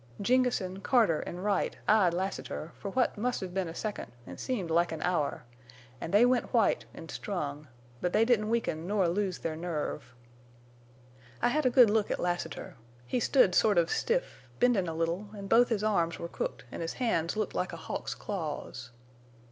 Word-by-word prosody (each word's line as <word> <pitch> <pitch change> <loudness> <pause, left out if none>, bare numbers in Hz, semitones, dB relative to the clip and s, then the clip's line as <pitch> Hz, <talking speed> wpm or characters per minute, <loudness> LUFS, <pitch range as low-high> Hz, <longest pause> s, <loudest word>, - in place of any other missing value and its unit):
"Jengessen, 220 -5 +1
Carter, 215 -10 +3
an' 175 - -6
Wright 200 -1 0
eyed 210 -5 +5
Lassiter, 180 -2 -4
for 200 - -4
what 245 0 0
must 245 +1 -1
hev 185 -2 -5
been 190 -2 -1
a 165 - -7
second 215 +2 -4
an' - - -9
seemed 200 -11 -2
like 170 +1 +3
an 160 -1 -4
hour, 175 -5 0 0.6
an' - - -4
they 205 +6 +6
went 245 -1 +1
white 225 -3 +3
en' 165 - -9
strung. 150 -6 -4 0.3
But 180 - 0
they 220 +4 +4
didn't 220 -3 +2
weaken 180 -8 -1
nor 200 -2 +2
lose 185 +1 -1
their 160 -1 -3
nerve. 160 -5 -4 1.2
"I - - +3
hed 300 +1 +2
a - - +5
good 245 -4 +6
look 215 -1 +2
at - - -1
Lassiter. 175 -5 -3 0.3
He 245 - -1
stood 240 -6 +4
sort 205 0 +4
of 170 -1 +3
stiff, - - -1 0.2
bendin' 235 -8 +3
a 165 - -3
little, 170 +5 -2
an' 200 - -7
both 235 +4 +5
his 215 -3 0
arms 170 -6 +1
were 170 - -5
crooked - - -4
an' - - -6
his 165 - -3
hands 215 -8 0
looked 215 -2 -1
like 180 - -1
a 170 - -7
hawk's - - -5
claws. 150 - -5
195 Hz, 190 wpm, -30 LUFS, 170-225 Hz, 1.2 s, they